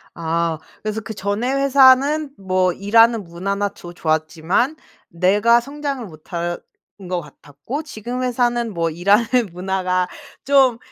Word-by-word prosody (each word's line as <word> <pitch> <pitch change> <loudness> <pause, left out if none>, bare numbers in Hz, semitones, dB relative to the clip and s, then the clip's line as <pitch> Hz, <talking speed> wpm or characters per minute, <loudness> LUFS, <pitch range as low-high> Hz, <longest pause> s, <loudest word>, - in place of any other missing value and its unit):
아 165 0 -1 0.2
그래서 215 0 -3
'그전에 210 +2 -3
회사는 275 +2 +4
뭐 185 -1 +1
일하는 225 +2 +4
문화나 200 +4 -2
조 175 -2 -12
좋았지만 165 - 0 0.3
내가 205 +7 +3
성장을 280 0 -5
못하는 170 +1 -5 0.5
것 180 -1 -1
같았고 150 - -8
지금 250 -3 -6
회사는 240 -3 0
뭐 165 -1 0
일하는 200 +7 +2 0.2
문화가 185 0 -1 0.4
좀 265 -4 +4
205 Hz, 260 characters per minute, -20 LUFS, 175-245 Hz, 0.5 s, 회사는